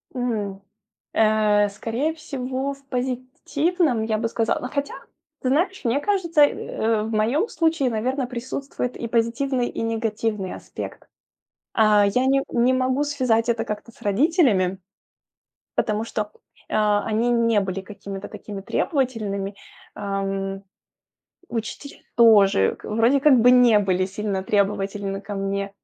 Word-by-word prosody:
М. 210 -6 -2 0.5
Э, 215 -1 +3
скорее 235 +10 -2
всего 270 -3 -4
в 275 0 -18
позитивном, 255 - -1
я 220 -1 0
бы 230 +1 -1
сказала. 225 0 0
Но 250 - -5
хотя, 280 -1 -3 0.5
ты 255 - 0
знаешь, 360 +8 +1
мне 245 +4 +1
кажется, 340 -4 +1
э, 225 -6 +1
в 220 - -4
моем 235 - +1
случае, 320 - +1
наверное, 250 +4 -1
присутствует 250 +1 -4
и 235 - -4
позитивный, 240 +2 0
и - - -5
негативный 225 -3 -2
аспект. - - -8 0.7
А, 210 -2 +5
я 250 +6 +1
не 275 0 +3
не 245 +2 +3
могу 260 +2 +1
связать 250 -6 +1
это 225 -1 +1
как-то 210 +2 -6
с - - -23
родителями 210 - +2 1.0
потому 215 -1 0
что, 210 -2 -3 0.4
э, - - -2 0.4
они 230 +3 +1
не 230 -3 +3
были 190 0 -3
какими-то 195 0 -8
такими 205 -2 -8
требовательными, 215 - -1 0.4
ам. 195 -1 -3 0.9
Учитель 235 +5 -6 0.2
тоже 205 - +5
к - - -11
вроде 230 +6 +3
как 290 -1 +6
бы 245 +2 +6
не 245 -3 +6
были 185 -2 +1
сильно 195 0 -3
требовательны 195 0 -1
ко 205 0 -6
мне. 195 0 -2
230 Hz, 135 wpm, -23 LUFS, 205-260 Hz, 1.0 s, как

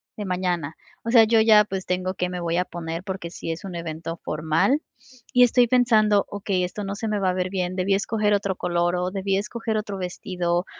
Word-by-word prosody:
de 210 - -5
mañana, 180 -5 -2 0.3
o 230 - -2
sea, 230 -3 +7
yo 225 0 +4
ya, 215 -2 +6
pues, 190 -2 -5
tengo 185 +1 -1
que 180 -1 -2
me 180 0 -4
voy 170 0 -1
a 180 - +2
poner 170 -1 -6
porque 190 -3 -5
sí 165 -1 -5
es 165 +4 -6
un 185 - -6
evento 165 0 -5
formal 160 - +1 0.5
y 250 0 +7
estoy 245 0 +4
pensando, 220 -5 +4
okey, 200 -2 -1
esto 195 +3 -4
no 195 +1 -4
se 220 +1 -3
me 210 - 0
va 185 -2 +2
a - - -3
ver 185 0 -1
bien, 185 -1 -2
debí 190 +1 +1
escoger 210 +1 +1
otro 200 -2 0
color 175 0 0
o 180 +1 -1
debí 195 0 -1
escoger 220 +2 -3
otro 210 -2 -3
vestido 180 -1 -2
190 Hz, 220 wpm, -24 LUFS, 175-210 Hz, 0.5 s, sea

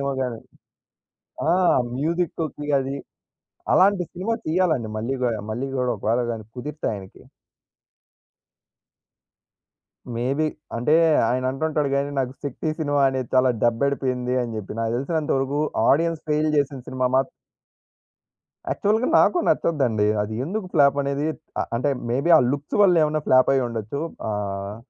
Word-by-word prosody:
ఏమో 140 0 -1
గాని. 125 -3 -2 1.1
ఆ! - - +4 0.5
మ్యుజిక్కుకి 160 -1 -2
అది. 135 +1 -3 0.8
అలాంటి 190 -1 +4
సినిమా 190 +6 -2
తీయాలండి 155 -9 +1
మళ్ళీ 120 +5 -2
గూడ, 120 -2 +1 0.2
మళ్ళీ 125 +5 -3
గూడ 125 -1 0
ఒకవేళ 115 +4 0
గాని 110 -1 -6
కుదిరితే 150 +5 -6
ఆయనకి. 95 -2 -10 2.9
మేబీ. 135 +6 0 0.3
అంటే, 125 +6 +2 0.3
ఆయనంటుంటాడు 135 +4 0
గానీ, 140 +1 0
నాకు 130 -1 -1
'శక్తి' 145 +3 -3
సినిమా 145 -2 +1
అనేది 130 -2 -3
చాలా 130 0 +5
దెబ్బడిపోయింది 125 0 0
అని 120 -2 -3
జెప్పి. 105 -3 -6
నాకు 115 0 -1
తెలిసినంత 150 +4 -2
వరుకూ 135 +2 -1 0.3
ఆడియన్స్ 165 +2 +2
ఫెయిల్ 155 +1 +1
జేసిన 140 -2 0
సినిమా 130 -1 0
మాత్ 135 0 +2 1.4
యాక్చువల్‌గా 220 +5 +1
నాకు 360 - +4
నచ్చద్దండి 125 -10 +1 0.2
అదీ. 105 +1 -5
ఎందుకు 195 +5 -3
ప్లాపనేదీ 140 -1 +2 0.3
అ - - +2
అంటే, 130 +5 0 0.2
మేబీ 140 +8 +1
ఆ - - +7
లుక్స్ 145 +1 -3
వల్లేవన్నా 155 -5 +4
ఫ్లాపయ్యుండచ్చు. 130 -2 +2 0.3
ఆహ్, 100 -1 -3
135 Hz, 120 wpm, -23 LUFS, 125-155 Hz, 2.9 s, ఆ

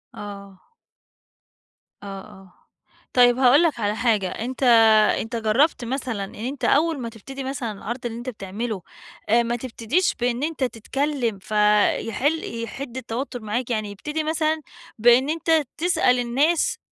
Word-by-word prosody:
آه. 200 -2 -10 1.3
آه - - -8
آه. 190 -3 -15 0.6
طيّب، 245 -1 +5
هاقول 265 +5 +6
لك 320 -7 +1
على 210 -1 0
حاجَة 215 -5 +1
أنتَ 250 +7 -5 0.6
أنتَ 225 +2 -5
جرّبت 235 +4 +2
مثلًا 250 -4 -3
إنّ 195 - -9
أنتَ 255 +6 -4
أوّل 315 +1 +2
ما 235 -2 -4
تبتدي 265 +5 -9
مثلًا 260 -4 -3
العرض 235 +5 -6
اللي 230 -1 -4
أنتَ 240 +2 -5
بتعمله، 210 -1 -5 0.5
آآ، 235 +2 +4
ما 235 +1 -1
تبتديش 255 +8 -1
بإنّ 245 +2 0
أنتَ 315 -3 -2
تتكلِم 250 -1 -2
فيحل 215 +6 +1
يحِدّ 250 +2 -7
التوتّر 245 +1 -5
معاك، 220 +4 -3
يعني 215 -3 -2
يبتدي 300 +10 -4
مثلًا 315 0 0 0.4
بإنّ 240 +4 +5
أنتَ 320 0 +2 0.2
تسأل 325 -7 +2
الناس 275 +8 +1
240 Hz, 140 wpm, -23 LUFS, 215-275 Hz, 1.3 s, هاقول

